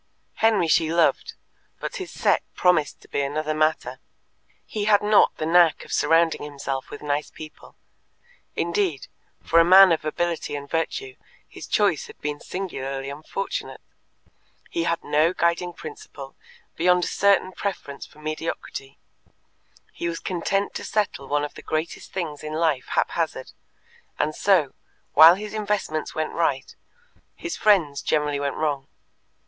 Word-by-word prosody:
Henry 215 Hz, -6 st, +3 dB
she 160 Hz, 0 st, +3 dB
loved, 170 Hz, 0 st, +1 dB, 0.4 s
but -, -, -5 dB
his 375 Hz, -3 st, -6 dB
set -, -, +1 dB
promised 175 Hz, -5 st, +2 dB
to -, -, -18 dB
be -, -, -1 dB
another 155 Hz, +2 st, -2 dB
matter. 155 Hz, +1 st, 0 dB, 0.7 s
He 210 Hz, -1 st, -3 dB
had 210 Hz, -1 st, +4 dB
not 210 Hz, 0 st, +4 dB
the 155 Hz, -, -2 dB
knack 170 Hz, 0 st, +4 dB
of -, -, -8 dB
surrounding 165 Hz, +2 st, +3 dB
himself 140 Hz, -2 st, -5 dB
with 145 Hz, -, -9 dB
nice 145 Hz, 0 st, -1 dB
people 155 Hz, -1 st, -12 dB, 0.8 s
indeed, 170 Hz, -4 st, -1 dB, 0.4 s
for 165 Hz, -, +4 dB
a -, -, +7 dB
man 185 Hz, +2 st, +8 dB
of 160 Hz, -, +1 dB
ability 165 Hz, 0 st, -2 dB
and 140 Hz, 0 st, -6 dB
virtue 390 Hz, -, -3 dB, 0.3 s
his -, -, -10 dB
choice 485 Hz, -, +1 dB
had 445 Hz, -, -14 dB
been 150 Hz, 0 st, -4 dB
singularly 135 Hz, -7 st, -5 dB
unfortunate; 155 Hz, +7 st, -5 dB, 0.9 s
he 335 Hz, -1 st, -1 dB
had 170 Hz, -, -1 dB
no 155 Hz, +4 st, +2 dB
guiding 170 Hz, 0 st, 0 dB
principle 430 Hz, -, -10 dB, 0.4 s
beyond 180 Hz, +1 st, +3 dB
a -, -, 0 dB
certain 200 Hz, -2 st, +2 dB
preference 185 Hz, -8 st, -5 dB
for -, -, -22 dB
mediocrity; 155 Hz, -3 st, -5 dB, 1.0 s
he 170 Hz, -, -3 dB
was 165 Hz, -, -4 dB
content 195 Hz, +2 st, -1 dB
to -, -, -5 dB
settle 205 Hz, -10 st, -2 dB
one 145 Hz, 0 st, 0 dB
of 150 Hz, -, -8 dB
the -, -, -11 dB
greatest 155 Hz, +2 st, -4 dB
things 165 Hz, -6 st, -4 dB
in 155 Hz, 0 st, -6 dB
life 155 Hz, -5 st, 0 dB
haphazard, -, -, -1 dB, 0.7 s
and 155 Hz, -, 0 dB
so, 175 Hz, -6 st, +2 dB, 0.4 s
while 165 Hz, +2 st, +9 dB
his 210 Hz, +2 st, -7 dB
investments 205 Hz, -7 st, -2 dB
went 155 Hz, -1 st, -2 dB
right, 145 Hz, -5 st, -1 dB, 0.6 s
his 345 Hz, -1 st, -5 dB
friends 170 Hz, -10 st, +3 dB
generally 150 Hz, -2 st, 0 dB
went 140 Hz, -1 st, -2 dB
wrong. 145 Hz, -3 st, -2 dB
165 Hz, 145 wpm, -24 LUFS, 150-190 Hz, 1.0 s, while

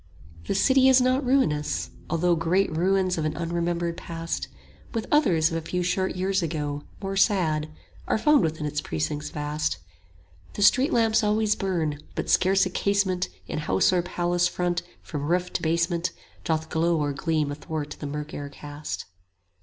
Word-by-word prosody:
35 -, -, -18 dB
The -, -, 0 dB
city 265 Hz, +6 st, +5 dB
is 260 Hz, 0 st, +7 dB
not 255 Hz, +2 st, +2 dB
ruinous, 155 Hz, -, +1 dB, 0.2 s
although 175 Hz, +1 st, +2 dB
Great 170 Hz, +1 st, +1 dB
ruins 185 Hz, +1 st, +2 dB
of 155 Hz, -, -1 dB
an 155 Hz, -, -2 dB
unremembered 170 Hz, 0 st, -1 dB
past, 165 Hz, 0 st, -4 dB, 0.5 s
With 225 Hz, -, -1 dB
others 175 Hz, -, +3 dB
of 165 Hz, -, -1 dB
a -, -, -3 dB
few 180 Hz, +2 st, -2 dB
short 185 Hz, +2 st, 0 dB
years 190 Hz, +1 st, 0 dB
ago 150 Hz, -3 st, -2 dB, 0.2 s
More 195 Hz, 0 st, -2 dB
sad, 165 Hz, -7 st, +2 dB, 0.4 s
are -, -, +2 dB
found 300 Hz, +6 st, +4 dB
within 160 Hz, -2 st, -1 dB
its 150 Hz, 0 st, -2 dB
precincts 145 Hz, -, -3 dB
vast. 150 Hz, -, -2 dB, 0.8 s
The 205 Hz, -, -1 dB
street 260 Hz, +9 st, +5 dB
lamps 225 Hz, -3 st, +3 dB
always 210 Hz, 0 st, +2 dB
burn; 165 Hz, -6 st, -1 dB, 0.2 s
but -, -, -2 dB
scarce 190 Hz, +1 st, +4 dB
a 185 Hz, -, -3 dB
casement 190 Hz, -2 st, +1 dB, 0.2 s
40 -, -, -7 dB
In -, -, -1 dB
house 95 Hz, -, +2 dB
or 180 Hz, -, +3 dB
palace 175 Hz, 0 st, 0 dB
front 175 Hz, -1 st, -1 dB, 0.2 s
from 145 Hz, -2 st, -4 dB
roof 180 Hz, +2 st, 0 dB
to -, -, -1 dB
basement 170 Hz, +2 st, 0 dB, 0.3 s
Doth 160 Hz, 0 st, -1 dB
glow 165 Hz, +1 st, +2 dB
or 145 Hz, -1 st, 0 dB
gleam 150 Hz, 0 st, 0 dB
athwart 150 Hz, +1 st, -5 dB
the 145 Hz, -, -4 dB
mirk 150 Hz, +1 st, -5 dB
air 145 Hz, 0 st, -5 dB
cast. 145 Hz, +1 st, -7 dB
170 Hz, 175 wpm, -26 LUFS, 155-195 Hz, 0.8 s, is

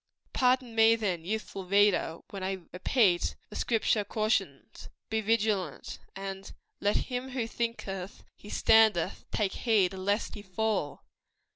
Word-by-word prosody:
Pardon 250 Hz, -2 st, +2 dB
me, 225 Hz, 0 st, +6 dB
then, 190 Hz, -7 st, -2 dB
youthful 195 Hz, -1 st, -4 dB
reader, 200 Hz, -4 st, +3 dB
when 195 Hz, -, -6 dB
I 190 Hz, -1 st, -3 dB
repeat 185 Hz, -1 st, +2 dB, 0.2 s
the -, -, -9 dB
Scripture 225 Hz, -2 st, +1 dB
cautions 200 Hz, -, -2 dB, 0.2 s
"Be 220 Hz, 0 st, +1 dB
vigilant;" 210 Hz, -7 st, -1 dB, 0.2 s
and 195 Hz, 0 st, -6 dB, 0.3 s
"Let 205 Hz, +1 st, +1 dB, 0.2 s
him 250 Hz, +1 st, -3 dB
who 250 Hz, -3 st, -2 dB
thinketh 210 Hz, -5 st, -4 dB
he 205 Hz, -, -13 dB
standeth, 215 Hz, -7 st, +3 dB
take 200 Hz, -3 st, -1 dB
heed 205 Hz, -6 st, +2 dB
lest 200 Hz, +3 st, -1 dB
he 205 Hz, -, -7 dB
fall." 200 Hz, -6 st, -2 dB
205 Hz, 130 wpm, -29 LUFS, 190-225 Hz, 0.3 s, me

